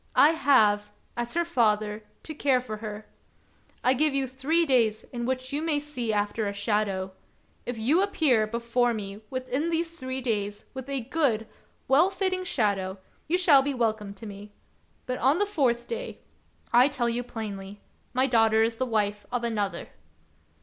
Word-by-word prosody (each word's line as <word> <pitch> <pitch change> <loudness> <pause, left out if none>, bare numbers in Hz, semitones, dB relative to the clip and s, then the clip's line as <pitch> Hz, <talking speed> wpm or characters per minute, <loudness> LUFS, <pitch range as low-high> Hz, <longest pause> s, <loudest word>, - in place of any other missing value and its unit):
I 300 - +7
have, 220 -9 +3 0.3
as 240 +3 -3
her 340 0 +2
father, 215 -8 +1 0.2
to 315 - -6
care 275 -3 +2
for 220 -4 -6
her. 215 0 -7 0.8
I 255 - +4
give 295 +2 +2
you 275 -1 +1
three 270 +7 +1
days 230 -6 +2
in 240 -1 -3
which 260 +1 -3
you 290 - 0
may 320 -2 +1
see 285 -6 -3
after 210 +1 -1
a 200 - -3
shadow. 200 -2 -1 0.6
If 245 -1 -3
you 275 +11 +3
appear 300 - +2
before 235 +1 0
me 200 0 -6
within 260 +4 -2
these 335 0 -2
three 260 0 -4
days 205 -5 -2
with 265 0 -7
a 275 -2 -1
good, 240 -4 0 0.4
well 295 +8 +5
fitting 375 -2 -1
shadow, 200 - 0 0.3
you 345 +4 +2
shall 320 -7 +6
be 280 0 -2
welcome 215 -4 -1
to 200 - -10
me; 205 0 -9 0.5
but 255 - -3
on 270 +6 +3
the 410 - +2
fourth 255 -12 0
day 475 +1 -5 0.3
— - - -33
I 245 +3 +7
tell 260 -4 -1
you 235 +1 0
plainly 205 -4 -7 0.2
— - - -39
my 260 +1 +4
daughter 225 -3 +4
is 225 0 -1
the 260 - -1
wife 210 -2 -1
of 245 -1 -1
another." 205 -6 -2
245 Hz, 175 wpm, -27 LUFS, 215-280 Hz, 0.8 s, I